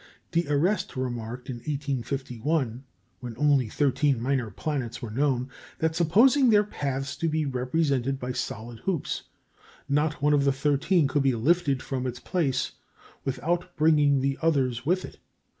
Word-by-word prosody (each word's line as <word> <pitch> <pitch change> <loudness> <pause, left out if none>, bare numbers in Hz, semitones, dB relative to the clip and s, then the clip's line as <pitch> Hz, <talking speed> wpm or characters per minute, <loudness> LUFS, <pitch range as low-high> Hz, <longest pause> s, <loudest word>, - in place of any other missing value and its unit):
D'Arrest 170 +4 +1
remarked 120 -1 -4
in 125 - -4
1851, 135 -1 -2 0.4
when 120 -3 -7
only 140 -4 +3
thirteen 140 0 +1
minor 125 -1 0
planets 130 +2 -3
were 115 -4 -6
known, 130 0 +1 0.3
that 160 0 0
supposing 235 - +5
their 210 -2 +5
paths 140 -8 -3
to 165 - 0
be 155 0 0
represented 135 0 0
by 125 0 -3
solid 115 -1 -5
hoops, 175 - -2 0.6
not 150 +1 +1
one 150 +1 +3
of 145 -1 +3
the 140 - +3
thirteen 145 +4 +2
could 145 +1 +1
be 135 -2 +2
lifted 140 +2 +2
from 130 -1 -3
its 125 0 -5
place 140 -4 -1 0.5
without 170 +6 -2
bringing 150 -3 +4
the 135 +1 -1
others 135 -6 +1
with 185 +2 +1
it. - - -13
140 Hz, 145 wpm, -27 LUFS, 125-155 Hz, 0.6 s, supposing